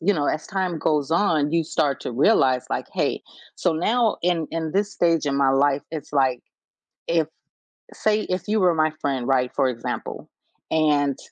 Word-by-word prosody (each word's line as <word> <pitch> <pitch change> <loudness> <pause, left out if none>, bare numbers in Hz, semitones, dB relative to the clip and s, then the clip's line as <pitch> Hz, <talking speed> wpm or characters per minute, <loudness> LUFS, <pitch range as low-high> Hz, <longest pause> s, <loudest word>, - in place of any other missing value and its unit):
you 200 +4 +2
know, 145 -2 -1
as 155 - -2
time 185 -4 -2
goes 150 -1 0
on, 160 -4 +2
you 165 -1 +2
start 145 -3 0
to - - -5
realize, 130 - +3
like, - - -2
"Hey," - - -1 0.4
so 175 - +1
now 220 +7 +1
in 170 -2 +1
in 160 -1 -3
this 200 +1 0
stage 165 -3 +1
in 140 -1 0
my 140 -1 +3
life, 140 +1 +2
it's 155 -3 -7
like 130 -3 +2 0.7
if 165 -2 +2 0.7
say 215 0 +1
if 185 0 -3
you 215 +1 +1
were 180 -3 +4
my 155 0 +2
friend, 135 -4 -1
right, 130 -2 +1
for 135 -2 +2
example, 115 -2 -5 0.4
and 145 -3 +2
155 Hz, 180 wpm, -23 LUFS, 140-175 Hz, 0.7 s, were